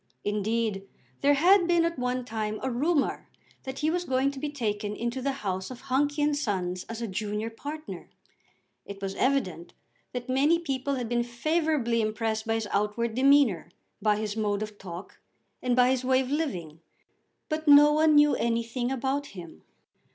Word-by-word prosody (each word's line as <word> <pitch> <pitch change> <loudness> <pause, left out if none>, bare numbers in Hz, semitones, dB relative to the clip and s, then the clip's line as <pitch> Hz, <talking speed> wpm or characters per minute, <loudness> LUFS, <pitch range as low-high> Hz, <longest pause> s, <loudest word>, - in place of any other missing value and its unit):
Indeed 210 -1 -1 0.3
there 285 +1 +4
had 355 +4 +5
been 345 -1 +3
at 335 -5 -2
one 250 0 -1
time 215 -2 -3
a 260 - -1
rumour 290 +4 0 0.4
that 265 0 -5
he 310 - +3
was 355 +1 -1
going 265 -2 +1
to 275 - -8
be 295 - -3
taken 210 -6 -3
into 235 +3 -3
the 275 +2 0
house 190 -1 -2
of 255 -1 -9
Hunky 285 +2 0
and 295 0 +2
Sons 185 -9 -2
as 230 +1 -6
a - - -2
junior 210 +3 -3
partner. 300 +6 -8 0.7
It 200 0 -9
was 195 -1 -4
evident 220 -12 -1 0.4
that 245 -1 -5
many 280 +6 +3
people 280 -4 -2
had 245 -3 -3
been 240 +1 +1
favourably 240 -1 0
impressed 220 0 -2
by 225 - +1
his 225 -2 -2
outward 210 +3 0
demeanour, 260 - +4 0.3
by 210 -1 +3
his 210 0 -3
mode 210 -1 -1
of 210 -1 -9
talk, 180 0 -9 0.4
and 250 -1 +1
by 250 0 +5
his 260 -1 0
way 260 +1 +3
of 260 0 -5
living. 180 - -3 0.7
But 310 0 -3
no 295 +1 +8
one 310 0 +4
knew 295 0 +6
anything 235 +2 -1
about 270 +2 -1
him. 165 - -10
245 Hz, 175 wpm, -27 LUFS, 215-285 Hz, 0.7 s, no